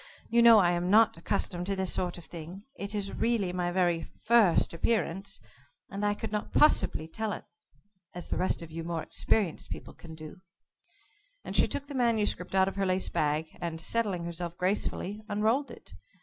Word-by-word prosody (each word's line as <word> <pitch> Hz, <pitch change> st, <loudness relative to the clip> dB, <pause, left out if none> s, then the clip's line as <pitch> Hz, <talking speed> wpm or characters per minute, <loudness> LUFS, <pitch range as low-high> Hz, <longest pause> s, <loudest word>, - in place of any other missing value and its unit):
You 235 Hz, 0 st, +5 dB
know 230 Hz, -1 st, +9 dB
I 180 Hz, -4 st, +5 dB
am 175 Hz, +1 st, -1 dB
not 220 Hz, +3 st, +5 dB
accustomed 175 Hz, +1 st, -2 dB
to 200 Hz, -, 0 dB
this 190 Hz, -1 st, 0 dB
sort 180 Hz, -1 st, -2 dB
of 175 Hz, -, -11 dB
thing. 175 Hz, +4 st, -9 dB
It 200 Hz, -4 st, -6 dB
is 200 Hz, -1 st, -2 dB
really 220 Hz, -6 st, 0 dB
my 180 Hz, -1 st, -1 dB
very 175 Hz, -2 st, +1 dB, 0.2 s
'first 225 Hz, -10 st, +4 dB
appearance,' 195 Hz, 0 st, -1 dB, 0.5 s
and 200 Hz, +2 st, -4 dB
I 205 Hz, 0 st, +2 dB
could -, -, -5 dB
not 210 Hz, -1 st, -3 dB
possibly 230 Hz, -, +3 dB
tell 215 Hz, +6 st, -3 dB
it -, -, -8 dB, 0.7 s
as 175 Hz, -, -8 dB
the -, -, 0 dB
rest 185 Hz, -2 st, 0 dB
of 165 Hz, -, -11 dB
you 165 Hz, +1 st, -5 dB
more 165 Hz, -1 st, -3 dB
experienced 200 Hz, -8 st, 0 dB
people -, -, -7 dB
can 160 Hz, -2 st, -11 dB
do," 155 Hz, +3 st, -11 dB, 1.0 s
and -, -, -6 dB
she -, -, +4 dB
took 280 Hz, -, -4 dB
the 285 Hz, -, -9 dB
manuscript 220 Hz, -7 st, 0 dB
out 190 Hz, 0 st, +4 dB
of 195 Hz, -, -4 dB
her 195 Hz, -, +1 dB
lace 185 Hz, 0 st, +1 dB
bag, 155 Hz, +1 st, 0 dB
and, 165 Hz, -1 st, -3 dB
settling 195 Hz, -1 st, 0 dB
herself 170 Hz, 0 st, -5 dB
gracefully, 200 Hz, +2 st, -1 dB
unrolled 220 Hz, +7 st, +1 dB
it. -, -, -13 dB
190 Hz, 190 wpm, -29 LUFS, 170-210 Hz, 1.0 s, know